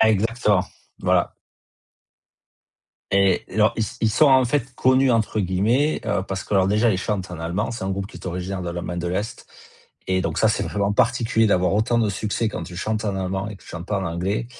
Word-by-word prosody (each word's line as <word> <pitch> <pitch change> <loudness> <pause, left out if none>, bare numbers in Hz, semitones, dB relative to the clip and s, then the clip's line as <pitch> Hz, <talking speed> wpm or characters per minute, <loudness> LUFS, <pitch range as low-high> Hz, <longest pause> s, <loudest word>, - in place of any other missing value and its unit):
Exactement, 110 -2 +3 0.4
voilà - - +2 1.8
et 100 -1 +3
alors, 105 +1 +3
ils 110 - +1 0.2
ils 110 - +3
sont, 155 +8 +4
en 130 -2 +6
fait, 125 0 -1
«connus» 130 0 +3
entre 110 -2 +1
guillemets, 110 - +1
heu, 100 -2 0
parce 95 0 -5
qu'alors, 95 -2 +2
déjà, 105 +3 +3
ils 95 - 0
chantent 95 -3 -3
en 90 - -7
allemand, 90 +8 -2
c'est 115 -5 -5
un 95 - -2
groupe 95 0 -3
qui - - -12
est - - -10
originaire 90 +2 -4
de 85 - -4
l'Allemagne 85 0 -4
de 85 - -2
l'Est 100 +5 -4 0.6
et 95 0 +2
donc, - - -2
ça - - +4
c'est - - 0
vraiment 100 0 -1
particulier 120 -2 +2
d'avoir 95 -2 +2
autant 115 +3 +2
de 110 - +2
succès 105 +3 -1
quand 90 - -5
tu 85 +1 -9
chantes 110 +3 -2
en 100 -2 -1
allemand 95 +1 -2
et 105 - -8
que - - -21
tu - - -17
chante 85 +1 -7
pas 105 -1 -1
en - - -3
anglais 95 +7 -2
105 Hz, 215 wpm, -23 LUFS, 95-115 Hz, 1.8 s, en